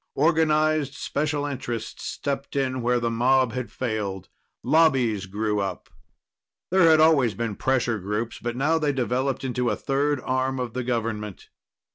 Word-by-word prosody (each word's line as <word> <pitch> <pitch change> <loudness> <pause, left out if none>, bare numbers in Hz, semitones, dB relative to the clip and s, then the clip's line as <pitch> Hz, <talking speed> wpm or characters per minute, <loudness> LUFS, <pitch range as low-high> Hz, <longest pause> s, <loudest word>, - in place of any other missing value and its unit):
Organized 155 -2 +2
special 145 0 -2
interests 120 -5 -5
stepped 140 -1 -4
in 130 -2 0
where 120 +1 +2
the 115 0 -1
mob 125 +1 +2
had 125 -4 -4
failed. 105 -7 -3 0.3
Lobbies 130 -9 +3
grew 105 +2 -1
up. 100 -1 -4 0.8
There 185 -3 +5
had 160 -1 +6
always 145 -8 +4
been 115 -3 -3
pressure 120 -3 0
groups, 105 +4 -3
but 120 0 -4
now 155 +5 +2
they 150 -2 +1
developed 130 +1 -1
into 125 -2 -1
a - - 0
third 145 +1 0
arm 130 +1 -1
of 125 -2 -4
the 125 - -2
government. 110 -4 -3
130 Hz, 150 wpm, -25 LUFS, 115-145 Hz, 0.8 s, had